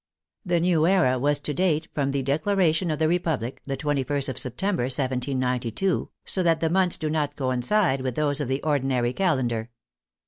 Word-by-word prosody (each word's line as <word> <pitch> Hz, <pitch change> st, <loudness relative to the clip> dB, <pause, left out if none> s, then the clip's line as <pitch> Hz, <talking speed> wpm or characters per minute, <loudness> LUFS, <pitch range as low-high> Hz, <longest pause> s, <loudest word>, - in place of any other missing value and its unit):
The 175 Hz, -4 st, +1 dB
new 165 Hz, -2 st, +2 dB
era 170 Hz, -10 st, +3 dB
was 145 Hz, +2 st, +2 dB
to 150 Hz, -, -3 dB
date 160 Hz, -1 st, +1 dB
from 140 Hz, -2 st, 0 dB
the 135 Hz, -1 st, -1 dB
declaration 165 Hz, +4 st, +1 dB
of 155 Hz, -, -1 dB
the 160 Hz, +1 st, +2 dB
Republic, 155 Hz, -8 st, -1 dB
the 135 Hz, -1 st, -2 dB
21st 140 Hz, -1 st, -1 dB
of 130 Hz, -, -2 dB
September, 135 Hz, -, -1 dB
1792, 130 Hz, -, -1 dB, 0.2 s
so 190 Hz, -, +1 dB
that 165 Hz, -2 st, +2 dB
the 160 Hz, 0 st, 0 dB
months 185 Hz, -1 st, +2 dB
do 155 Hz, -, -3 dB
not 150 Hz, -2 st, -1 dB
coincide 135 Hz, -, +1 dB
with 130 Hz, -2 st, -3 dB
those 145 Hz, -1 st, 0 dB
of 145 Hz, -, -2 dB
the 135 Hz, +2 st, -1 dB
ordinar}^ 130 Hz, -5 st, +1 dB
calen 160 Hz, -10 st, +1 dB
dar. 115 Hz, -1 st, -3 dB
145 Hz, 180 wpm, -25 LUFS, 130-165 Hz, 0.2 s, era